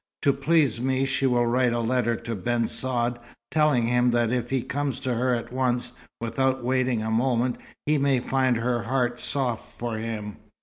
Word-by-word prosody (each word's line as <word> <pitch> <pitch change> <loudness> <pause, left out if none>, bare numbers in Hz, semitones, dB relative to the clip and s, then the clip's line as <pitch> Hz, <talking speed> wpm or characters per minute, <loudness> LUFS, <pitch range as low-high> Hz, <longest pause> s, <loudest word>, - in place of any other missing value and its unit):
To 140 - +4
please 140 -4 +2
me, 130 +1 +1
she 135 0 +1
will 120 -1 +2
write 120 0 +2
a 120 - 0
letter 120 0 +1
to 115 0 -5
Ben 115 +3 0
Saad, 120 -1 0 0.3
telling 150 -6 +3
him 125 +1 +3
that 120 -1 +2
if 120 -1 -1
he 130 -2 0
comes 140 -1 -2
to 130 -2 -1
her 125 +1 +1
at 120 +1 -6
once, 125 -1 0 0.3
without 130 +3 0
waiting 125 -2 +1
a 110 - -2
moment, 120 +1 +1 0.3
he 150 0 +2
may 140 -2 +2
find 130 -1 +1
her 120 +1 0
heart 120 0 -1
soft 125 -5 -3
for 115 -2 -3
him. 110 -2 -5
125 Hz, 185 wpm, -25 LUFS, 115-130 Hz, 0.3 s, To